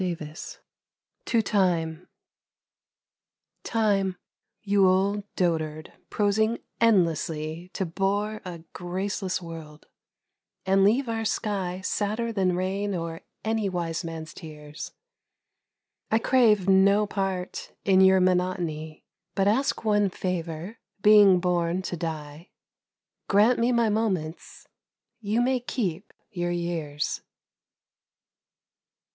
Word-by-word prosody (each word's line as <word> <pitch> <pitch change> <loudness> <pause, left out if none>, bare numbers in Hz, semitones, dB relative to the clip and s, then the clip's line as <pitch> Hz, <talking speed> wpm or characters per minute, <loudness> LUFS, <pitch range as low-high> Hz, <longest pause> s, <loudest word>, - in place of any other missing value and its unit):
108 160 -4 -5 0.7
TO 230 - +2
TIME 175 -5 0 1.6
TIME! 200 -5 +1 0.5
you 200 -2 +4
old 195 +2 +2
dotard 155 -3 -1 0.2
prosing 220 +2 +1 0.2
endlessly 170 -5 +1
To 190 - -1
bore 200 +5 -1
a 175 -4 -8
graceless 185 +1 -3
world, 160 -2 -10 0.8
and 195 +1 +4
leave 240 +7 +3
our 225 -1 -2
sky 195 -4 -2
Sadder 215 +4 -1
than 185 -3 +1
rain 195 +2 -1
or 165 -1 -4 0.2
any 220 -2 0
wise 170 -3 -2
man's 165 -1 -6
tears, 150 0 -9 1.2
I 220 - +3
crave 225 -5 +3
no 200 +2 +5
part 195 -3 -3
in 190 -1 +5
your 190 0 +6
monotony, 180 -4 -1 0.3
But 195 0 +2
ask 230 +2 +1
one 205 -2 +3
favour, 180 +2 -4 0.2
being 205 -3 +7
born 175 0 0
to 180 - -3
die, 155 -1 -6 0.8
Grant 220 +4 +4
me 235 +2 +2
my 235 -2 +3
moments, 190 -7 -2 0.5
you 220 +1 0
may 255 +1 +2
keep 205 -7 -3 0.2
your 175 -3 -2
years. 170 -4 -2
190 Hz, 105 wpm, -26 LUFS, 170-210 Hz, 1.6 s, being